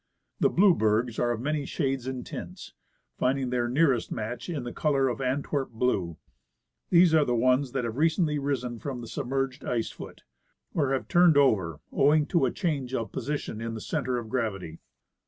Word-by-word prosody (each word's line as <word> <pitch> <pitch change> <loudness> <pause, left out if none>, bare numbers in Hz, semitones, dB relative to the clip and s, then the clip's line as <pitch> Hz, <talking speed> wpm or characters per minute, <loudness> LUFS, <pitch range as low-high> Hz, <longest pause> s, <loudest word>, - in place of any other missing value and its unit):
The - - +4
blue 190 +1 +5
bergs 110 -1 +1
are 120 - +1
of 120 -1 -2
many 150 +2 -1
shades 135 -4 -2
and 130 -2 -4
tints, - - -8 0.5
finding 130 0 0
their 120 -1 0
nearest 135 -2 +2
match 115 +6 -4
in 130 -8 -4
color 135 -4 +1
in - - -4
AntAverp 135 +1 -1
blue. 105 -8 -1 0.7
These 175 -2 +5
are 155 -2 +5
the 125 -3 0
ones 130 +2 +2
that 135 -2 -1
have 115 +1 -4
recently 155 -1 +2
risen 125 -4 -2
from 130 -2 -5
the 115 - -8
submerged 135 +1 -3
ice 115 -2 -1
foot, - - -11 0.5
or 140 -4 +1
have 135 - -2
turned 175 -3 +5
over 95 - +2
owing 150 +2 +4
to 165 -7 +3
a - - -1
change 140 -8 -2
of 115 -2 -3
position 130 -4 -4
in 115 0 -4
the - - -5
center 130 -1 -2
of 120 -2 -5
gravity. 100 -9 -3
130 Hz, 180 wpm, -27 LUFS, 120-145 Hz, 0.7 s, blue